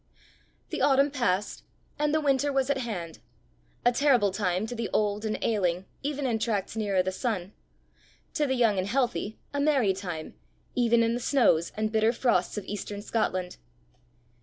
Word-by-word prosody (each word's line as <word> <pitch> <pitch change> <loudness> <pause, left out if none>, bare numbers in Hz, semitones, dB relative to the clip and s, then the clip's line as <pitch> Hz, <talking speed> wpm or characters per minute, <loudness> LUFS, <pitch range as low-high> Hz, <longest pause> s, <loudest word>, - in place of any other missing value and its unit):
The - - -2
autumn 275 +1 +4
passed, 210 -7 -1 0.4
and 300 0 +2
the 315 - +2
winter 285 -1 +2
was 270 0 +1
at 275 - 0
hand 180 -10 -5 0.7
a 245 - +6
terrible 245 -6 +3
time 190 0 0
to 225 - -5
the 230 -2 -3
old 210 0 0
and 215 - -1
ailing 185 -4 0 0.2
even 285 0 -2
in 230 -3 0
tracts 210 -3 -1
nearer 200 -4 +1
the 185 - -1
sun 195 -2 -3 0.8
to 300 -3 +1
the 265 - +1
young 225 -6 +3
and 185 - -1
healthy 240 -3 -1 0.2
a 285 - -1
merry 275 -9 +3
time 175 -5 -6 0.4
even 235 -1 +3
in 230 0 +1
the 240 - -1
snows 235 - +3
and 215 0 0
bitter 220 0 +3
frosts 230 -7 +1
of 205 - -4
eastern 205 0 -5
Scotland. 185 -5 -1
220 Hz, 170 wpm, -28 LUFS, 195-260 Hz, 0.8 s, a